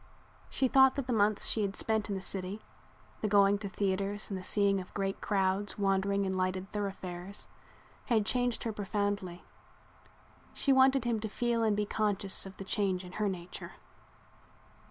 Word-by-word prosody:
She 265 - +2
thought 265 +1 +6
that 275 - -2
the 250 - -1
months 210 -1 +2
she 220 - +3
had 200 -1 -1
spent 220 -2 0
in 200 - -1
the 190 - -4
city, 190 +2 -4 0.6
the 215 - +1
going 200 0 +4
to 200 -1 -5
theaters 200 +1 -2
and 190 - -2
the - - -8
seeing 200 0 +2
of 180 - -12
great 195 -1 -2
crowds 195 0 0
wandering 200 0 +1
in 190 - -1
lighted 185 +1 -2
thoroughfares, 195 -2 -4 0.6
had 220 -4 +2
changed 245 +1 0
her 225 - -2
profoundly. 200 -3 -2 1.1
She 275 - +2
wanted 265 -1 +5
him 235 -2 +1
to 220 0 -4
feel 235 +2 0
and 215 -2 +2
be 210 - +1
conscious 205 -2 0
of 190 - -12
the 195 - -7
change 190 -2 0
in 180 - -10
her 210 +1 -1
nature. 180 -2 -7
200 Hz, 175 wpm, -31 LUFS, 190-215 Hz, 1.1 s, thought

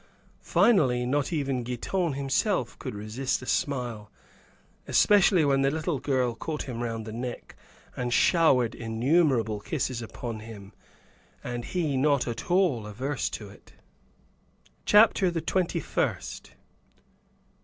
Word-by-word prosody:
Finally 130 - +3
not 140 +4 0
even 140 -5 -1
Giton 145 +8 -2
himself 135 -6 0
could - - -6
resist 110 +6 -2
a - - -7
smile, 120 -7 -2 0.8
especially 195 -5 +4
when 135 -1 +2
the 135 - +3
little 155 0 -2
girl 130 -3 0
caught 150 +6 -4
him 120 -3 -6
around 115 -2 -3
the 110 0 -8
neck 120 +1 -6 0.4
and 125 -1 -3
showered 125 -5 +3
innumerable 115 -1 +1
kisses 130 0 -3
upon 115 0 -6
him, 105 -3 -11 0.7
and 120 -1 -4
he 160 -7 -1
not 140 -1 +2
at 120 +7 -5
all 175 - +2
averse 130 +5 -3
to 105 -2 -7
it. 100 - -18 1.1
CHAPTER 210 -3 +5
THE 170 -1 -2
TWENTY 175 +1 0
FIRST. - - -3
130 Hz, 125 wpm, -27 LUFS, 115-155 Hz, 1.1 s, CHAPTER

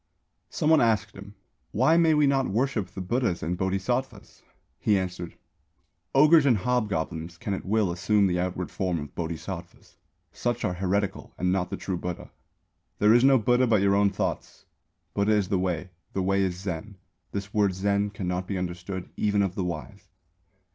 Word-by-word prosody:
Some 155 - +1
one 160 - +6
asked 110 -2 +2
him: 100 +1 -11 0.3
"Why 130 +9 +3
may 165 -2 +4
we 150 -1 +4
not 135 -1 +2
worship 115 -1 0
the 95 - -8
Buddhas 95 - -1
and 85 +4 -1
Bodhisattvas?" 100 +5 -2 0.4
He 105 -2 +3
answered: 90 -2 -4 0.8
"Ogres 150 +1 +6
and 120 -5 +4
hobgoblins 90 -8 -2
can 100 - -3
at 95 - -5
will 105 -2 +1
assume 100 +4 +2
the 90 -2 +1
outward 90 0 -3
form 90 -3 -1
of 75 -3 -8
Bodhisattvas; 85 -1 -7 0.3
such 120 -1 -2
are 90 - 0
heretical 95 +2 -2
and 90 0 +1
not 95 -1 +1
of - - -24
the - - -4
true 95 -2 -3
Buddha. 90 0 -6 0.7
There 105 +1 +5
is 120 +1 +5
no 135 0 +6
Buddha 125 +2 +3
but 110 -4 +3
your 100 0 +4
own 100 0 +4
thoughts. 95 - -4 0.5
Buddha 100 +2 +2
is 105 -3 +1
the 95 - +1
Way. 90 -1 -2 0.2
The 95 - -1
Way 95 +1 +2
is 90 -2 -1
Zen. 95 +2 -5 0.4
This 100 0 -5
word 100 -3 +2
Zen 100 +1 +1
cannot 90 -2 -3
be 100 - -2
understood 90 +1 -5
even 105 -1 +2
of 95 -2 -1
the 95 - -2
wise. 90 +3 -6
100 Hz, 180 wpm, -26 LUFS, 90-110 Hz, 0.8 s, one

